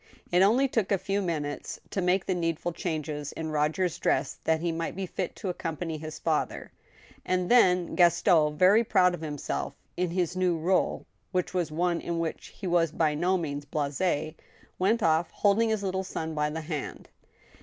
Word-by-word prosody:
It 180 +1 +4
only 235 +8 +5
took 225 -6 -1
a 200 - +4
few 195 +2 -1
minutes 150 -5 -3
to 195 - -1
make 180 +1 +2
the 185 - 0
needful 170 -1 -1
changes 155 -4 -4
in 160 -1 -4
Roger's 155 +4 0
dress 135 +1 0
that 160 0 +2
he 170 +1 -1
might 165 0 -3
be 195 0 -3
fit 185 0 -4
to 200 - -4
accompany 165 -2 -4
his 155 0 -7
father; 160 -2 -2 0.5
and 185 +1 0
then 180 -8 +4
Gaston, 160 -3 +4
very 200 +7 +6
proud 180 -4 +3
of 175 - -6
himself 150 -3 -4 0.2
in 180 0 0
his 175 0 -1
new 180 -2 +1
r$le, 180 +4 +1 0.3
which 180 -1 -1
was 175 -4 -1
one 170 +2 0
in 170 -1 -3
which 165 -1 -3
he 195 - -10
was 170 -3 +2
by 155 -2 +1
no 180 +5 +1
means 145 -4 -4
blasts 145 0 -3 0.8
went 210 +4 +2
off, 160 +1 +3
holding 215 +3 +2
his 215 -2 0
little 190 0 -1
son 160 -4 -4
by 150 -1 0
the 160 +2 -4
hand. 155 -2 -6
175 Hz, 185 wpm, -28 LUFS, 155-185 Hz, 0.8 s, very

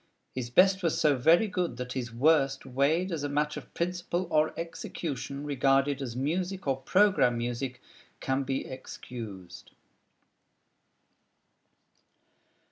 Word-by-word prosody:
His 125 -2 -4
best 190 +8 +5
was 165 -4 0
so 150 -2 +4
very 165 - +4
good 180 - -2
that 125 0 -5
his 125 -3 -4
worst 135 +2 +2
weighed 145 +8 +1
as 165 -3 -2
a 145 - -1
matter 150 +1 0
of - - -17
principle 175 +1 -2
or 155 0 +3
execution, 145 -4 -5
regarded 135 0 +2
as 120 -4 -4
music 180 +8 -2
or 135 -2 +1
"programme 185 - +3
music" 120 +2 -3 0.4
can 135 +1 0
be 135 0 -2
excused. 105 -8 -9
140 Hz, 125 wpm, -29 LUFS, 130-170 Hz, 0.4 s, best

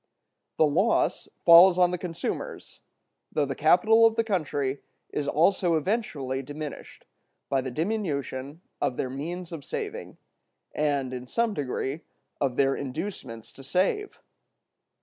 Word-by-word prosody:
The 155 - +5
loss 180 +10 +1 0.2
falls 175 +2 +9
on 180 -1 +4
the 180 - -1
consumers; 170 -2 -5 0.5
though 145 - +1
the 135 - -3
capital 180 +10 +4
of 225 - -2
the 230 - +2
country 145 - -1 0.3
is 145 - -2
also 175 +3 +3
eventually 150 - -1
diminished, 145 +2 -8 0.4
by 135 -1 +1
the 130 - -4
diminution 150 - -3 0.2
of 125 - 0
their 130 - -2
means 170 +6 -5
of 160 -4 -7
saving, 450 - -6 0.6
and, 140 -4 0
in 125 0 -6
some 230 - 0
degree, 140 -1 -3 0.4
of 135 -3 0
their 135 0 +3
inducements 135 - -6
to 135 - -14
save. 190 - -1
155 Hz, 130 wpm, -27 LUFS, 135-185 Hz, 0.6 s, falls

